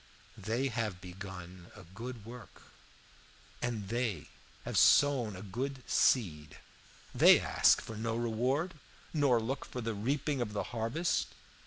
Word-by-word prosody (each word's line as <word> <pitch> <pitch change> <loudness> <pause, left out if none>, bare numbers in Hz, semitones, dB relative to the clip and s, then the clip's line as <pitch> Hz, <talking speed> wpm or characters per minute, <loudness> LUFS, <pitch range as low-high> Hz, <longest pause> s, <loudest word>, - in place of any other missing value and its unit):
They 115 +7 -1
have 110 -6 -3
begun 90 -1 -9
a 105 - -12
good 110 +5 -8
work, 120 -2 -12 1.0
and 110 -5 -3
they 115 - -2 0.4
have - - -4
sown 130 -8 +4
a 90 - -8
good 130 +6 -4
seed; 75 - +1 0.6
they - - +7
ask - - +4
for 110 - -8
no 115 +1 -2
reward, 125 +9 0 0.4
nor 140 -6 +3
look 130 +5 -3
for 125 - -7
the 115 -1 -2
reaping 135 +6 -1
of 105 -3 -3
the 105 - -1
harvest. 120 +10 0
115 Hz, 135 wpm, -32 LUFS, 100-125 Hz, 1.0 s, they